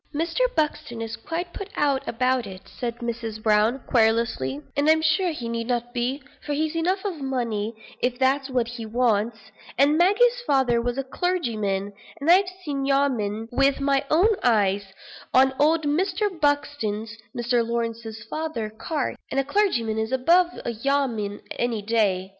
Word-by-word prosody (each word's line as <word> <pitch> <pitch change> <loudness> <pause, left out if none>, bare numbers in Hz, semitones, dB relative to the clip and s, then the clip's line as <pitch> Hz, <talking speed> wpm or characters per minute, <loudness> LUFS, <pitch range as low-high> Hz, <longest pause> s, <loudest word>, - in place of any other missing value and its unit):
"Mr. 330 +7 -1 0.2
Buxton 300 -5 -1
is 225 0 -4
quite 345 +1 -5
put 395 0 -6
out 280 -2 +2
about 255 -1 0
it," 190 -1 -11
said 235 -2 -4
Mrs. 230 -2 -4
Brown, 215 +3 +3
querulously; 225 - +1 0.2
"and 285 +2 +2
I'm 315 0 +4
sure 320 +4 +2
he 280 -8 -5
need 230 0 -3
not 245 -1 -2
be, 255 +3 -2 0.2
for 295 - -3
he's 310 +2 -1
enough 370 +4 0
of 350 -7 -3
money, 230 -5 -2 0.3
if 245 0 0
that's 265 +1 +1
what 250 -3 0
he 240 -1 -6
wants; 225 -1 +1 0.4
and 290 +4 +4
Maggie's 475 +7 +4
father 255 -4 +3
was 245 +1 -2
a 275 - -1
clergyman, 225 - -1 0.3
and 300 +4 +3
I've 370 +1 +5 0.2
seen 280 -2 -2
'yeoman,' 245 -6 0
with 275 +2 +2
my 275 -1 +2
own 350 +8 +5
eyes, 205 -4 +2 0.5
on 265 +1 +6
old 315 +2 +3
Mr. 375 +7 +1
Buxton's 290 - -1 0.2
(Mr. 240 0 +1
Lawrence's 230 -1 -3
father's) 310 -7 -3
carts; 300 -6 -2
and 275 - 0
a - - +2
clergyman 265 - +1
is 220 +2 -2
above 335 +8 +4 0.2
a - - -1
yeoman 230 -4 -1 0.2
any 235 -3 -1
day. 200 -4 +1
255 Hz, 160 wpm, -24 LUFS, 225-300 Hz, 0.5 s, on